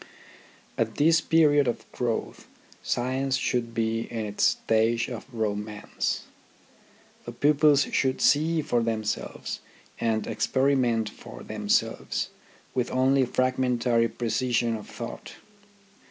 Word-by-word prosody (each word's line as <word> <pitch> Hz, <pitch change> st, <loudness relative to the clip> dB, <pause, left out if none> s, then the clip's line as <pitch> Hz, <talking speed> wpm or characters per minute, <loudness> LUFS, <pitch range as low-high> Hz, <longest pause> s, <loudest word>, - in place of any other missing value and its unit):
At -, -, 0 dB
this 165 Hz, +3 st, +4 dB
period 145 Hz, -4 st, +4 dB
of 120 Hz, -, -2 dB
growth 120 Hz, -2 st, -3 dB, 0.3 s
science 130 Hz, +2 st, 0 dB
should 120 Hz, -2 st, -1 dB
be 115 Hz, 0 st, 0 dB
in 115 Hz, -2 st, -3 dB
its 105 Hz, 0 st, -2 dB
stage 115 Hz, +1 st, +2 dB
of 120 Hz, +2 st, -8 dB
romance. 105 Hz, -2 st, -2 dB, 1.0 s
The -, -, -5 dB
pupils 145 Hz, -1 st, +4 dB
should 130 Hz, -1 st, +1 dB
see 160 Hz, +2 st, +3 dB
for 120 Hz, -3 st, +1 dB
themselves, 110 Hz, -2 st, -3 dB, 0.4 s
and 110 Hz, -1 st, 0 dB
experiment 130 Hz, -5 st, +1 dB
for -, -, -10 dB
themselves, -, -, -1 dB, 0.4 s
with 125 Hz, -2 st, 0 dB
only 130 Hz, +1 st, +3 dB
fragmentary 125 Hz, -2 st, +1 dB
precision 120 Hz, 0 st, 0 dB
of 105 Hz, -, -8 dB
thought. -, -, -8 dB
120 Hz, 110 wpm, -26 LUFS, 115-135 Hz, 1.0 s, this